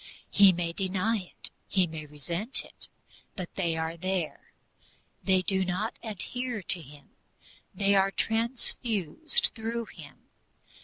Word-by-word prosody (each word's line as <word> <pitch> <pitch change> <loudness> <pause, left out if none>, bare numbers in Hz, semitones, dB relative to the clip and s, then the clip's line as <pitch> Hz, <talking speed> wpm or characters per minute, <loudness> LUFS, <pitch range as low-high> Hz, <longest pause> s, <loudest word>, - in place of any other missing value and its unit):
He 200 -1 +8
may 170 -1 -1
deny 195 +4 +1 0.2
it, - - -9 0.2
he 190 -2 +4
may 160 -2 -7
resent 170 - -2
it, - - -12 0.5
but 185 -4 -6
they 170 -4 0
are 160 +1 -1
there. 185 -1 -2 0.7
They 190 -1 +3
do 190 0 +2
not 185 +5 -2
adhere 235 +1 -3
to 175 - +1
him, 145 -1 -14 0.6
they 200 0 +3
are 195 0 +5
transfused 230 - +1
through 230 +1 -3
him. - - -11
190 Hz, 125 wpm, -29 LUFS, 170-225 Hz, 0.7 s, He